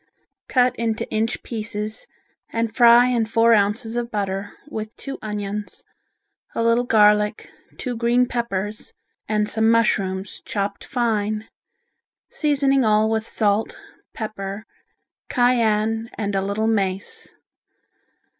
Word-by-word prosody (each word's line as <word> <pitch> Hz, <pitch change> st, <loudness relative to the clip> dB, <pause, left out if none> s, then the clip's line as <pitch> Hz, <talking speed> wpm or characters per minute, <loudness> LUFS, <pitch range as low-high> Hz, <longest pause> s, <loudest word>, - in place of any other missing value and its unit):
Cut 250 Hz, -1 st, +3 dB
into 225 Hz, -1 st, -1 dB
inch 225 Hz, +2 st, -1 dB
pieces 215 Hz, -, -5 dB, 0.4 s
and 230 Hz, -1 st, -2 dB
fry 240 Hz, 0 st, +7 dB
in 235 Hz, -3 st, +1 dB
four 230 Hz, 0 st, +4 dB
ounces 220 Hz, +2 st, +1 dB
of 240 Hz, -1 st, -2 dB
butter, 200 Hz, -2 st, -3 dB, 0.2 s
with 220 Hz, -6 st, -6 dB
two 275 Hz, -, -7 dB
onions, 210 Hz, -1 st, -5 dB, 0.7 s
a 230 Hz, -, 0 dB
little 230 Hz, +1 st, +3 dB
garlic, 210 Hz, -2 st, +3 dB, 0.3 s
two 250 Hz, -2 st, -4 dB
green 240 Hz, +2 st, +2 dB
peppers 215 Hz, -4 st, -3 dB, 0.4 s
and 210 Hz, -1 st, +1 dB
some 220 Hz, +1 st, +2 dB
mushrooms, 195 Hz, -4 st, +1 dB
chopped 200 Hz, -1 st, -3 dB
fine, 215 Hz, -3 st, -1 dB, 0.8 s
seasoning 275 Hz, -3 st, +2 dB
all 215 Hz, 0 st, +3 dB
with 220 Hz, 0 st, -1 dB
salt, 210 Hz, 0 st, 0 dB, 0.3 s
pepper, 210 Hz, -1 st, -6 dB, 0.6 s
cayenne, 225 Hz, -2 st, +2 dB
and 205 Hz, -2 st, -2 dB
a 195 Hz, -, +1 dB
little 200 Hz, +3 st, -1 dB
mace. 195 Hz, -3 st, -2 dB
220 Hz, 115 wpm, -22 LUFS, 210-235 Hz, 0.8 s, fry